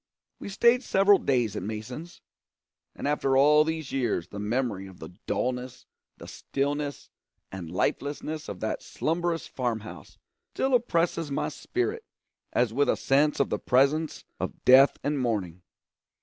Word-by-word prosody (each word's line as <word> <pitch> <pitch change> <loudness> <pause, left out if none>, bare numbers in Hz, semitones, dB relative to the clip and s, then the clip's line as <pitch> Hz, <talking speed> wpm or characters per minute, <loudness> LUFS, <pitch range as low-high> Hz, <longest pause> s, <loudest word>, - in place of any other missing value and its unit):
We - - -7
stayed 235 +5 +4
several 195 -4 +4
days 120 -6 0
at - - -3
Mason's; 110 - -7 0.7
and - - -4
after 135 -2 +1
all 150 +2 +6
these 160 -2 -4
years 120 -10 -1
the 100 - -7
memory 105 -2 -2
of 95 -2 -13
the 80 - -8 0.2
dullness, 125 0 -3 0.3
the - - -11
stillness 145 +1 -3 0.4
and 90 -4 -7
lifelessness 145 - -2
of 95 - -7
that 110 - -2
slumberous 165 +1 -2
farm 120 -4 -2
house 90 -8 -11 0.4
still 265 0 0
oppresses 170 -9 +1
my 140 - -1
spirit 395 - -3 0.5
as 120 -2 +1
with 145 +3 +2
a - - +2
sense 145 +2 +2
of 140 - +1
the - - 0
presence 140 +5 +1
of - - -5
death 135 +2 +7
and 145 0 0
mourning. 100 -8 -2
140 Hz, 150 wpm, -27 LUFS, 110-160 Hz, 0.7 s, death